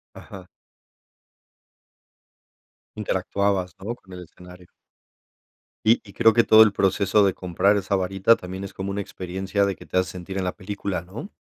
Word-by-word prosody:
Ajá. 95 -2 -11 2.5
Interactuabas, 100 -2 -1
¿no?, 110 +5 -5
con 95 -6 -17
el 90 0 -8
escenario. 90 +1 -15 1.2
Y 115 +2 +4
y 100 - -14
creo 115 -1 +4
que 115 +1 +4
todo 110 0 +8
el 105 -2 +1
proceso 100 +1 +2
de 95 - +2
comprar 95 +3 +1
esa 100 0 -1
varita 95 +4 +3
también 95 0 -8
es 100 - -10
como 95 +1 -5
una 100 - -3
experiencia 95 +1 -2
de 100 -1 -2
que - - -13
te - - -3
hace 90 -2 +1
sentir 95 +1 -7
en 95 - -1
la 90 - -3
película, 100 -2 -4
¿no? 100 - -9
95 Hz, 165 wpm, -24 LUFS, 90-100 Hz, 2.5 s, todo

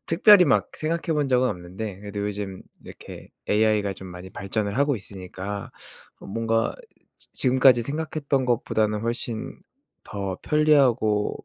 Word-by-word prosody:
특별히 185 +2 +7
막 - - +2
생각해 160 0 -2
본 145 -2 0
적은 125 0 +3
없는데 95 +2 -6
그래도 100 0 -6
요즘 100 -2 -4 0.2
이렇게 - - -11 0.2
AI가 105 -1 +2
좀 95 - -10
많이 90 +1 -10
발전을 100 +2 -3
하고 140 -1 +2
있으니까 95 0 -7 0.5
뭔가 115 +2 -1 0.4
'지 - - -14
지금까지 130 -2 +4
생각했던 145 -1 -2
것보다는 110 -3 0
훨씬 115 0 -4 0.5
더 100 -2 -4
편리하고 130 -9 +2
110 Hz, 305 characters per minute, -24 LUFS, 100-135 Hz, 0.5 s, 특별히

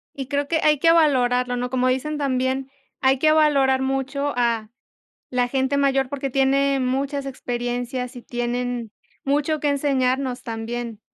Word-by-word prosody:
Y 270 -2 -5
creo 285 0 -1
que 320 0 +1
hay 300 -1 +4
que 330 +3 +5
valorarlo, 250 -6 +3
¿no? 245 0 -2
Como 255 0 +1
dicen 280 +4 -1
también: 265 -1 -1 0.3
"Hay 265 0 +3
que 310 +4 +3
valorar 280 -4 +3
mucho 270 +2 -1
a 230 -3 0 0.6
la 250 -1 +1
gente 265 +1 0
mayor 270 -2 +2
porque 275 -1 -4
tiene 275 +1 +2
muchas 275 +2 -1
experiencias 245 0 -4
y 245 - -9
tienen 240 -1 -3 0.3
mucho 295 +2 +1
que 295 - 0
enseñarnos 265 -2 0
también". 230 -1 -5
265 Hz, 150 wpm, -23 LUFS, 245-280 Hz, 0.6 s, que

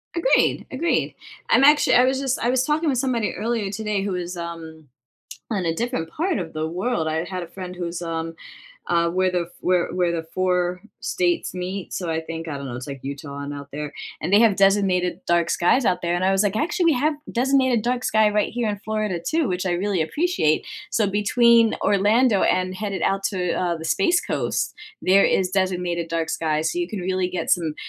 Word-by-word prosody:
Agreed, 425 +9 +2
agreed. 320 +6 0 0.3
I'm - - +5
actually, 295 +1 +5
I 250 - +6
was 260 +1 +1
just 270 -1 -1
I 235 - 0
was 255 0 +2
talking 305 +3 +1
with 265 - 0
somebody 240 -4 0
earlier 225 -2 -2
today 210 -1 -2
who 195 -1 -2
is, 180 0 -4
um, 165 -2 -7 0.7
on 200 -5 -1
a 165 -1 0
different 195 -6 -3
part 335 - -1
of 170 -4 -5
the 155 0 -2
world. 175 -1 -1
I 160 +1 -1
had 185 0 -5
a 170 - -7
friend 185 -1 -8
who's, 175 -1 -5
um, 165 -1 -4 0.5
uh, 170 -1 +2
where 185 +1 +1
the 175 -1 -2
where 180 -1 +1
where 180 -1 +1
the 165 -1 -3
4 180 -1 0 0.2
states 175 -1 0
meet, 185 +1 -5
so 180 - -3
I 160 0 -1
think, 165 0 -6
I 145 - -4
don't 140 - -7
know, 125 - -6
it's, 125 +1 -6
like, 140 -1 -6
Utah 140 +1 -6
and 140 0 -5
out 140 0 -8
there, 150 +1 -5 0.3
and 175 - -2
they 205 - +7
have 225 -4 +4
designated 195 -2 +2
dark 170 -1 +2
skies 235 +9 +2
out 185 - +1
there, 170 0 0
and 175 +1 0
I 190 - +3
was, 195 +1 +3
like, 205 0 0
actually 345 - 0
we 330 - +5
have 295 +5 +1 0.2
designated 260 -2 +2
dark 250 +2 -1
sky 215 -1 +3
right 210 0 +1
here 240 -2 -1
in 205 -1 -2
Florida 215 -4 -2
too, 320 -1 +1
which 180 -2 -2
I 180 - +1
really 190 +1 0
appreciate. 290 - +1 0.3
So 215 - +2
between 230 +3 +4
Orlando 205 +2 +3
and 185 0 +1
headed 200 0 -4
out 195 0 +1
to, 180 -4 -1
uh, 175 -2 -1
the 160 - -9
Space 350 - +2
Coast, - - -1 0.3
there 195 +2 +5
is 185 -1 +2
designated 180 -3 -1
dark 165 -1 -2
sky, 155 -1 0
so 350 - -1
you 350 - -1
can 210 -4 -5
really 185 0 -1
get 180 0 -3
some 165 -4 +1
185 Hz, 215 wpm, -23 LUFS, 170-225 Hz, 0.7 s, they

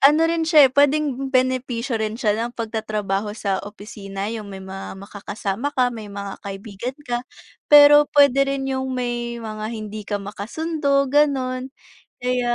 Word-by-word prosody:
...ano 300 +4 +6
rin 330 -1 0
siya, 305 -4 +8
eh, 260 - +4
puwedeng 285 -2 +2
benepisyo 255 -2 0
rin 220 0 -2
siya 215 -4 +1
ng 235 +3 -3
pagtatrabaho 215 -2 -3
sa 195 -3 -1
opisina, 205 0 -7
'yong 215 -3 -6
may 195 - -8
mga 190 0 -7
maka-kasama 205 +4 -4
ka, 250 -1 +2
may 215 -3 -8
mga 200 -1 -7
kaibigan 205 +5 -6
ka. 240 0 -2 0.5
Pero 295 0 +8
puwede 275 -1 +4
rin 275 -1 -2
'yong 265 0 -2
may 240 -1 -3
mga 215 -2 -6
hindi 215 -2 -6
ka 205 - 0
maka-sundo, 275 +8 -1
gano'n. 265 -2 +1 0.5
Kaya, 245 -1 0
240 Hz, 155 wpm, -22 LUFS, 210-275 Hz, 0.5 s, siya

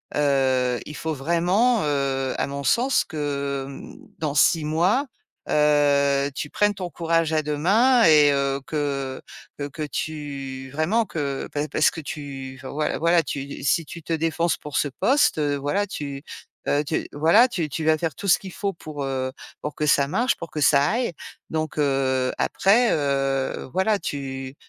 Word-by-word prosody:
heu, 130 -4 +2
il 150 - -8
faut 160 0 -3
vraiment, 175 - +2
heu, 135 -2 0
à - - 0
mon 140 0 -5
sens 250 - +2
que, 140 -3 -3
hem, 140 - -10 0.2
dans 155 -3 -2
6 155 +2 +4
mois, 180 - +2 0.4
heu, 145 -2 +3
tu 150 - -4
prennes 205 +5 +2
ton 185 -3 -5
courage 165 0 0
à 155 -1 +1
deux 150 0 -2
mains 230 - +4
et 150 -2 +6
heu, 140 0 0
que 140 -3 -2 0.4
que 145 - -2
que 155 +2 -6
tu 140 -3 -5
vraiment 175 - +1
que 145 -7 -3
pa 145 +1 -1
parce 155 - +3
que 165 - -7
tu 140 -3 -7
enfin, 130 - -6
voilà 150 +1 -1
voilà, 170 +1 +3
tu 140 -1 -5
si 165 +3 +2
tu 170 +3 -9
te 165 - -7
défonces 165 +1 0
pour 150 -1 -5
ce 145 - +1
poste, 265 - +2
heu, 145 -1 +1
voilà, 145 +9 0
tu, 140 -5 -6 0.4
heu, 145 +1 +2
tu 155 +2 -2
voilà, 165 - +5
tu 175 -11 -3
tu 155 +3 -4
vas 160 0 +5
faire 160 -2 -2
tout 200 - -6
ce 175 - +5
qu'il 190 -2 -9
faut 200 -1 -2
pour, 155 -3 -7
heu, 130 -1 -2 0.3
pour 150 0 -5
que 150 - -1
ça 140 -1 +3
marche, 240 - +1
pour 170 - -7
que 150 - -4
ça 140 0 +5
aille 235 -4 -1 0.4
donc, 155 -1 -3
heu, 135 -3 +1
après, 225 +5 +3
heu, 135 -3 -1
voilà, 200 +2 +2
tu, 135 -3 -5
150 Hz, 180 wpm, -24 LUFS, 140-165 Hz, 0.4 s, et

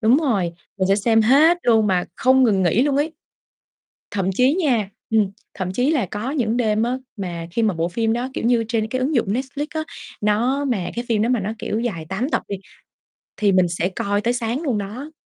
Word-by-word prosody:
Đúng 230 +4 +5
rồi, 245 - +1 0.4
mình 190 0 +1
sẽ 195 - +4
xem 225 +1 +3
hết 305 +9 +5
luôn 225 -3 +4
mà 185 -3 +1
không 260 +1 +4
ngừng 200 -6 +3
nghỉ 185 +8 +3
luôn 280 -1 +1
ấy. 305 +3 0 1.0
Thậm 195 -2 0
chí 255 +7 +3
nha 250 - +1 0.2
ừm, 215 -3 +2 0.2
thậm 185 -2 -3
chí 250 +8 +2
là 270 -10 +1
có 215 +8 -4
những 240 -6 0
đêm 220 -2 +1
á 250 +2 0 0.2
mà 170 -3 -5
khi 230 - 0
mà 215 -3 +2
bộ 165 0 -1
phim 225 +4 0
đó, 245 +2 -2
kiểu - - -3
như, 235 -1 +3
trên 225 -1 0
cái 255 +4 -2
ứng 275 +3 0
dụng 230 - +2
Netflix 270 +4 -3
á, 315 -1 -1 0.4
nó 240 +7 +1
mà 205 -9 -1
cái 240 +1 -3
phim 220 -3 +1
đó 225 - +1
mà 250 -2 +2
nó, 205 +2 -3
kiểu, 215 - -2
dài 200 -10 -3
8 215 +9 -2
tập - - 0
đi 200 - -3 0.8
thì 205 -2 +3
mình 185 -1 +4
sẽ 175 +1 -1
coi 200 +2 -1
tới 240 +3 +1
sáng 240 +3 -2
luôn 265 -9 0
đó. 220 +10 -6
225 Hz, 230 wpm, -21 LUFS, 200-255 Hz, 1.0 s, Đúng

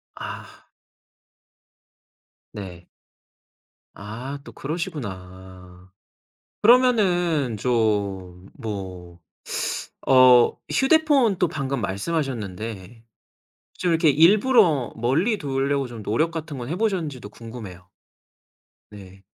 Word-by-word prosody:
아. - - -9 1.8
네. 90 -5 -9 1.1
아 120 +8 -7
또 - - -11
그러시구나. 95 - -7 0.7
그러면은 180 - +3
좀 100 -6 -1
뭐 95 -5 -7 0.9
어 130 -2 +6
휴대폰 270 - +3
또 180 - +2
방금 140 -5 -3
말씀하셨는데 110 - -4 0.7
좀 180 - -1
이렇게 165 -1 +3
일부러 175 - +4
멀리 160 - +1
두려고 140 -1 -1
좀 115 -3 -9
노력 155 +12 0
같은 155 -4 -6
건 120 +1 -6
해 170 - -3
보셨는지도 165 - -2
궁금해요. 105 -6 -11 1.0
네. 95 -2 -13
125 Hz, 175 characters per minute, -23 LUFS, 100-165 Hz, 1.8 s, 어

